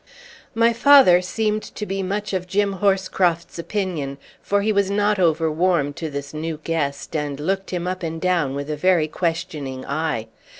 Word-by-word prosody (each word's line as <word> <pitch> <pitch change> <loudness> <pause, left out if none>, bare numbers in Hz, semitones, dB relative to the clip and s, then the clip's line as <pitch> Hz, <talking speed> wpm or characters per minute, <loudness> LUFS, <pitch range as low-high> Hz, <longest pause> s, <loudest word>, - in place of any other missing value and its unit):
My 230 +1 +4
father 235 -8 +7
seemed 215 +3 -1
to 210 - -7
be 195 0 -3
much 200 +2 -3
of 180 -1 -2
Jim 200 +1 0
Horscroft's 185 -4 +1
opinion; 170 -8 -3 0.2
for 200 0 0
he 215 - +2
was 200 -2 +2
not 205 0 +1
over 165 -2 +2
warm 160 -3 +1
to 160 +2 -5
this 140 0 -6
new 155 0 -4
guest 150 -2 -2
and 145 -2 -2
looked 195 +5 -2
him 175 -1 -3
up 185 +1 -3
and 165 -1 -4
down 170 -7 +1
with 140 +2 -4
a - - -1
very 170 0 +2
questioning 160 -6 -3
eye. 155 -6 -2
175 Hz, 175 wpm, -22 LUFS, 155-195 Hz, 0.2 s, father